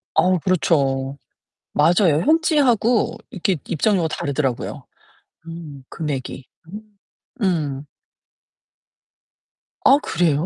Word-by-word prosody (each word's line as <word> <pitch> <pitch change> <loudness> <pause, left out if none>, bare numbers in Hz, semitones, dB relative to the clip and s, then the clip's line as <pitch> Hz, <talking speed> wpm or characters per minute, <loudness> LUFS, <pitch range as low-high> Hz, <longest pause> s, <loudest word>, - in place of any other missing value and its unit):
아우 185 -1 +3
그렇죠. 140 -6 0 0.6
맞아요. 170 -3 +3
현지하고 280 -8 +2
이렇게 190 0 -1
입장료가 175 0 +1
다르더라고요. 140 -4 -3 0.6
음 155 -5 -9
금액이. 135 -4 -5 0.2
음. 210 +3 -8 0.6
음. 150 -7 -1 2.0
아 275 - +7
그래요? 165 - 0
165 Hz, 200 characters per minute, -21 LUFS, 140-195 Hz, 2.0 s, 아